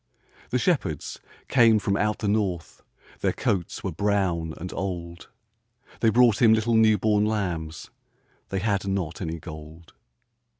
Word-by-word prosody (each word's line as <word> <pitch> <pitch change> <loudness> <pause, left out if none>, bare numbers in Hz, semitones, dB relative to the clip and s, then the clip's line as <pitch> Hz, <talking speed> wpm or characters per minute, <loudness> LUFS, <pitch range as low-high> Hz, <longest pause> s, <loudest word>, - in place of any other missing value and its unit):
The 125 - +1
shepherds 120 - -1 0.3
came 115 -4 +5
from 100 -1 0
out 105 +1 0
the 105 - -3
north, 100 -5 -1 0.4
Their - - 0
coats 90 -4 -2
were 95 - -2
brown 90 -3 0
and 90 +2 -7
old, 85 -3 -5 0.7
They 115 - +4
brought 120 -1 +4
Him 110 -2 +7
little 110 +1 0
new 110 -1 +5
born 105 +1 +2
lambs 85 -7 -3 0.6
They 95 -1 -2
had 100 -2 0
not 95 -4 -2
any 85 -2 -3
gold. 80 0 -11
100 Hz, 140 wpm, -25 LUFS, 85-110 Hz, 0.7 s, Him